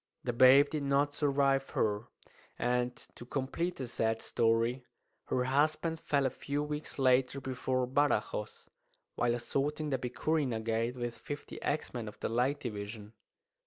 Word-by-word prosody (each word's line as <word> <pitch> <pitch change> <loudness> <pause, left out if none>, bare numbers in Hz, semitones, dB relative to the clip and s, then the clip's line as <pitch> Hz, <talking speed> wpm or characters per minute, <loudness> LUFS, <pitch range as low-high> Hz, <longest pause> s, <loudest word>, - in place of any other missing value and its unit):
The 120 - -1
babe 130 +4 +7
did 155 -1 -1
not 140 +1 +2
survive 140 -2 +2
her; 105 +1 0 0.5
and, 125 0 0 0.2
to - - -10
complete 140 +8 -2
the 130 - -5
sad 115 -1 0
story, 115 +2 +1 0.4
her 125 - 0
husband 155 +5 +1
fell 140 -3 +1
a 130 - +1
few 145 +1 -3
weeks 150 0 -5
later 130 0 +3
before 130 -1 -1
Badajoz, 125 -6 0 0.5
while 120 0 +1
assaulting 145 +5 -1
the 130 - +1
Picurina 125 0 0
Gate 115 +2 -1
with 120 -1 -4
fifty 145 0 -7
axemen 125 -6 -2
of 105 - -9
the - - -2
Light 125 +5 +1
Division. 105 -1 -6
130 Hz, 145 wpm, -32 LUFS, 120-145 Hz, 0.5 s, babe